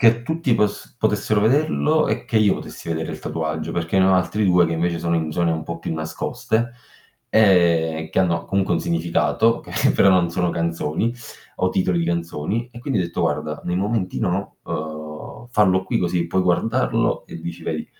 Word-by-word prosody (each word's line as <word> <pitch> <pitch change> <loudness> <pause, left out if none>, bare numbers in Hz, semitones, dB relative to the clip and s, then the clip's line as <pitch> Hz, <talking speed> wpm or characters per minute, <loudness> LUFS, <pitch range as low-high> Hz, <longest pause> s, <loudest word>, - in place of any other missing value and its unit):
che 115 -1 +5
tutti 160 -1 0
poss 105 +3 -1
potessero 105 -1 +1
vederlo, 155 +5 +2
e - - -1
che 115 - +1
io 105 -2 +4
potessi - - -9
vedere 80 -1 -2
il - - -7
tatuaggio, 80 0 -3
perché 85 +2 0
ne 95 - +5
ho 95 - +5
altri 105 +3 +1
2 90 -1 +5
che 85 - -2
invece 85 +1 0
sono 85 +1 -1
in 80 -2 -1
zone 85 +1 +1
un 80 -1 -3
po' 85 +1 -6
più 85 - -4
nascoste, 110 +8 -2 0.6
ehm, 85 -6 +3
che - - -1
hanno 85 -3 +1
comunque 95 -2 0
un - - 0
significato 85 +7 +1
che - - 0
però 100 - +4
non 90 -3 +4
sono 90 +1 0
canzoni, 85 +6 -1 0.4
o 95 - +1
titoli 90 -1 +1
di 85 - 0
canzoni, 85 +7 -2
e 120 - -10
quindi 135 -4 -1
ho - - +2
detto: 85 - -4
"Guarda, - - -1
nei 90 - -1
momenti 100 0 -1
no, 95 +3 -2
uhm, 75 +8 -6
farlo 95 -5 +3
qui - - 0
così 85 -1 0
puoi 95 +3 0
guardarlo, 115 +8 +1
e - - -9
dici 85 +1 -7
vedi" 80 -1 -3
90 Hz, 195 wpm, -22 LUFS, 85-105 Hz, 0.6 s, che